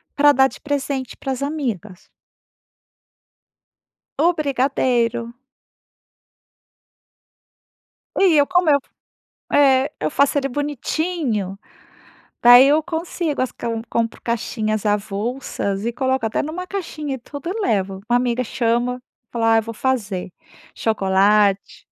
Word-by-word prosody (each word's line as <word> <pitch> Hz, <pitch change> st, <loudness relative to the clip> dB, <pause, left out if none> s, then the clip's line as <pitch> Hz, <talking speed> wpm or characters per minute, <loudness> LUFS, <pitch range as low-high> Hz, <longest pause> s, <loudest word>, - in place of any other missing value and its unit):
para 290 Hz, 0 st, +6 dB
dar 265 Hz, -1 st, +4 dB
de -, -, -13 dB
presente 280 Hz, -2 st, -3 dB
para 270 Hz, -, -5 dB
as 260 Hz, -, -4 dB
amigas. 230 Hz, -, -4 dB, 2.2 s
O 350 Hz, -, +5 dB
brigadeiro. 250 Hz, -5 st, 0 dB, 2.8 s
E 370 Hz, -4 st, +5 dB
eu 285 Hz, -, +5 dB
como 355 Hz, -2 st, +2 dB
eu 285 Hz, -, +5 dB
f -, -, -32 dB, 0.6 s
é, 270 Hz, -1 st, +4 dB
eu 155 Hz, -, -1 dB
faço 280 Hz, +1 st, +2 dB
ele 275 Hz, -1 st, -1 dB
bonitinho, 290 Hz, -, -2 dB, 0.8 s
daí 245 Hz, +2 st, +9 dB
eu 300 Hz, +2 st, +3 dB
consigo 325 Hz, -2 st, -3 dB
as 255 Hz, -, -2 dB
cai 235 Hz, -, -5 dB
que 230 Hz, -, -2 dB
eu -, -, -6 dB
compro 230 Hz, 0 st, -1 dB
caixinhas 215 Hz, -2 st, -2 dB
avulsas 205 Hz, 0 st, -2 dB
e 235 Hz, -, -1 dB
coloco 260 Hz, 0 st, -1 dB
até 220 Hz, -, -1 dB
numa 335 Hz, +5 st, -5 dB
caixinha 310 Hz, -7 st, -4 dB
e -, -, -5 dB
tudo 285 Hz, +7 st, -8 dB
eu 435 Hz, +4 st, -3 dB
levo, 195 Hz, -, -1 dB
a 240 Hz, -, +3 dB
amiga 245 Hz, 0 st, 0 dB
chama, 240 Hz, +1 st, 0 dB
eu 250 Hz, -, -11 dB, 0.3 s
falo: 235 Hz, -1 st, -1 dB
“Ah 225 Hz, 0 st, +5 dB
eu 225 Hz, -, +1 dB
vou 230 Hz, +1 st, -7 dB
fazer." 210 Hz, -8 st, -2 dB, 0.4 s
Chocolate 200 Hz, -1 st, +2 dB
250 Hz, 130 wpm, -21 LUFS, 220-285 Hz, 2.8 s, daí